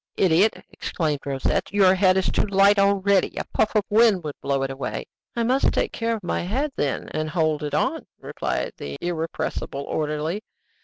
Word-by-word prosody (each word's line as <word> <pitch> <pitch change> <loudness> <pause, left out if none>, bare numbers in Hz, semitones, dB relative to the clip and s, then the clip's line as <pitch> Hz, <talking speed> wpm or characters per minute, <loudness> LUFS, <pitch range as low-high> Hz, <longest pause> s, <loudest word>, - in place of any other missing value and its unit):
"Idiot!" 190 +4 +3
exclaimed 155 -4 -2
Rosette. 135 -1 -1
"Your 195 -2 +5
head 185 0 +4
is 190 - +1
too - - +1
light 200 +1 +4
already; 200 -1 +2
a - - -1
puff 215 - +1
of 210 - +4
wind 215 -4 +4
would 150 -2 -4
blow 140 -1 0
it 135 - -2
away." 135 0 -4 0.3
"I 235 - 0
must 255 +4 +2
take - - 0
care 230 -1 -1
of 215 - -8
my 175 - -1
head, 260 - -1
then, 140 - -2
and 155 0 -3
hold 155 -2 0
it 150 -1 -3
on," - - -1
replied - - -3
the 70 0 -6
irrepressible 165 -4 -3
orderly. 155 +6 -2
185 Hz, 185 wpm, -24 LUFS, 150-205 Hz, 0.3 s, Your